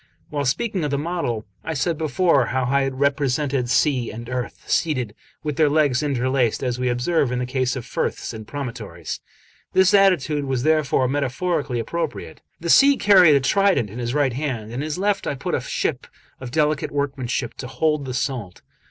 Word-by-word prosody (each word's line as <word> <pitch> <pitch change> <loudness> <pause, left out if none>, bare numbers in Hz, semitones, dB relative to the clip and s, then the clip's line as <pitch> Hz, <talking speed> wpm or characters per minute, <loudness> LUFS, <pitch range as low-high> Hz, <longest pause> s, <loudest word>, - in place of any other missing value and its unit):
While 145 -2 -1
speaking 185 - 0
of 150 - 0
the 140 - 0
model, 145 -8 -2 0.2
I 160 - -3
said 165 +4 0
before 155 -3 +2
how 130 +1 0
I 140 +3 +2
had 135 -1 -2
represented 140 -2 0
Sea 130 -3 +2
and 115 +2 -8
Earth, 125 -1 -4
seated, 130 -10 0 0.3
with 150 -3 -3
their 155 -2 +4
legs 145 -3 +2
interlaced, 130 -4 0
as 125 -1 -1
we 125 0 0
observe 125 +3 +1
in 125 - -1
the 125 - -1
case 130 0 -1
of 125 -3 -5
firths 125 - -3
and 110 -1 -8
promontories; 115 - -6 0.5
this 190 -1 +4
attitude 160 -7 +3
was 130 -2 -1
therefore 155 -4 +2
metaphorically 140 +1 -1
appropriate. 165 +7 -4 0.2
The 170 0 0
Sea 280 0 +6
carried 185 -7 +6
a - - +5
trident 155 - +2
in 115 - -7
his 120 +2 -2
right 140 -4 +2
hand, 130 -4 -3
and 110 +2 -10
in 125 - -3
his 150 +1 -3
left 200 +1 0
I 145 - -1
put 130 - -4
a - - +1
ship - - -2 0.3
of 130 - -7
delicate 150 +1 +1
workmanship 135 -4 -2
to 125 - -6
hold 150 +2 0
the 130 -1 -4
salt. 120 -9 -3
140 Hz, 190 wpm, -22 LUFS, 125-155 Hz, 0.5 s, Sea